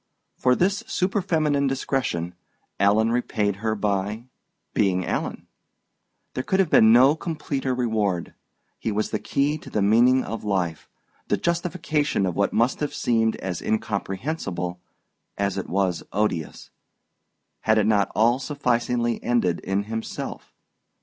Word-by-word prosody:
For 125 -1 +3
this 195 +6 +1
superfeminine 160 -7 +1
discretion 130 -10 -1 0.5
Alan 105 +3 +3
repaid 105 -4 0
her 110 +1 -1
by 105 +2 -1 0.5
being 95 -3 +1
Alan. - - -3 0.9
There 130 - -2
could 190 - 0
have 185 -5 +2
been 110 0 +7
no 130 +5 +6
completer 150 -5 -3
reward. 105 -8 -1 0.5
He 110 - -2
was 105 +1 -1
the 110 - -1
key 145 +2 0
to - - -11
the 105 - 0
meaning 120 +5 +5
of 115 - -5
life, 90 -6 -2 0.4
the - - +1
justification 165 - 0
of 90 -3 -2
what 100 - +1
must 120 +4 +1
have 150 - -3
seemed 115 -2 +1
as 95 -2 -4
incomprehensible 100 - -3 0.6
as 100 -1 0
it - - -6
was 95 -2 0
odious, 95 -6 -2 0.9
had 110 0 +2
it 105 - +3
not 105 -2 +2
all 115 +5 +3
sufficingly 120 -4 0
ended 105 -8 +1
in 95 +2 -1
himself. 110 +1 -6
110 Hz, 135 wpm, -24 LUFS, 100-135 Hz, 0.9 s, been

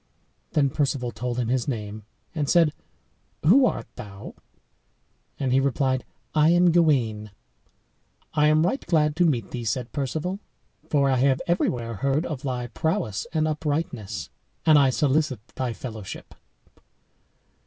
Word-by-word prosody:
"Then 140 -3 +3
Perceval 135 -4 -1
told 125 0 -4
him 120 -2 -1
his 125 -1 0
name, 105 -4 -4 0.3
and 150 -4 -2
said, 165 -4 +4 0.7
"Who 250 - +6
art - - -3
thou?" 105 -5 -9 1.1
And 130 -2 0
he 135 - +5
replied, 135 -1 0 0.3
"I 155 0 +4
am 175 0 +5
Gawain." 125 -11 +2 1.0
"I 150 0 +4
am 155 +2 +4
right 230 +10 -1
glad 150 -3 +2
to 175 - +4
meet 125 -7 -1
thee," 120 -2 -4
said 115 +2 -2
Perceval, 155 +7 -3 0.5
"for 140 -2 +3
I 130 - +2
have 135 +1 +3
everywhere 120 - -1
heard 140 - 0
of 145 -5 -4
thy 125 -4 -3
prowess 120 - -2
and 155 -1 +1
uprightness; 150 - -3 0.3
and 155 -2 +7
I 135 -2 +5
solicit 135 -3 +1
thy 130 -2 -3
fellowship." 110 -4 -8
140 Hz, 140 wpm, -25 LUFS, 120-155 Hz, 1.1 s, and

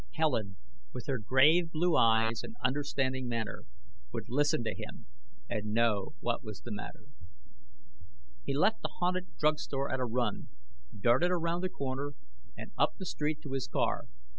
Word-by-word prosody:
Helen, 115 -12 0 0.4
with 125 - -6
her 135 -3 -1
grave 150 +9 +5
blue 170 +1 +2
eyes 115 -1 +4
and - - -8
understanding 130 -1 0
manner, 115 -2 -3 0.5
would - - -5
listen 145 -1 +2
to 110 - -1
him - - -8 0.4
and 105 - -2
know 110 -4 +2
what 120 +3 -1
was 105 -4 -8
the 120 - -8
matter. 105 0 -7 1.4
He 140 - -1
left 215 +9 +3
the - - -4
haunted 180 +1 -1
drug 150 0 +3
store 135 0 -2
at 130 - 0
a 130 - +1
run, 120 +1 -1 0.5
darted 125 - +4
around 170 -1 0
the 185 - 0
corner 140 -1 -3 0.4
and - - -8
up - - +3
the 190 - -6
street 150 -2 -2
to 140 - -7
his 135 -1 -1
car. - - 0
130 Hz, 165 wpm, -32 LUFS, 115-155 Hz, 1.4 s, grave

